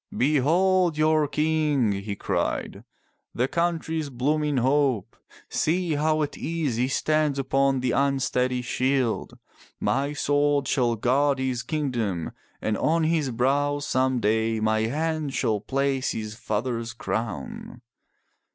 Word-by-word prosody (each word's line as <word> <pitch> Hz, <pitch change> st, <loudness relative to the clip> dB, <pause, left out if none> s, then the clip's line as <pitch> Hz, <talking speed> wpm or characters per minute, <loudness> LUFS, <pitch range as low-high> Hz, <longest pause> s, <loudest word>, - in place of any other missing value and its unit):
"Behold 165 Hz, +5 st, +3 dB
your 155 Hz, -1 st, +3 dB
King!" 150 Hz, -5 st, +1 dB
he 100 Hz, +1 st, -4 dB
cried, -, -, -2 dB, 0.5 s
"the 125 Hz, +2 st, +1 dB
country's 160 Hz, -2 st, -1 dB
blooming 145 Hz, +3 st, 0 dB
hope! 130 Hz, -4 st, +1 dB, 0.3 s
See 170 Hz, +1 st, 0 dB
how 155 Hz, +1 st, +1 dB
at 145 Hz, -, -5 dB
ease 155 Hz, -8 st, -2 dB
he 125 Hz, +2 st, +1 dB
stands 155 Hz, +1 st, +1 dB
upon 135 Hz, 0 st, +1 dB
the 125 Hz, -1 st, 0 dB
unsteady 130 Hz, -2 st, +1 dB
shield. 130 Hz, -1 st, -1 dB, 0.4 s
My 140 Hz, +2 st, 0 dB
sword 145 Hz, -1 st, +1 dB
shall 120 Hz, -4 st, +1 dB
guard 135 Hz, +5 st, +2 dB
his 130 Hz, -2 st, -1 dB
kingdom, 120 Hz, -, -2 dB, 0.3 s
and 110 Hz, -1 st, 0 dB
on 165 Hz, +1 st, +2 dB
his 155 Hz, -3 st, +1 dB
brow 140 Hz, +4 st, +1 dB
some 130 Hz, -3 st, 0 dB
day 110 Hz, +1 st, +1 dB
my 110 Hz, 0 st, +1 dB
hand 155 Hz, +1 st, -2 dB
shall 110 Hz, -2 st, +1 dB
place 135 Hz, +3 st, 0 dB
his 110 Hz, -1 st, -5 dB
father's 115 Hz, +1 st, -3 dB
crown." 110 Hz, -, -5 dB
135 Hz, 125 wpm, -25 LUFS, 120-150 Hz, 0.5 s, Behold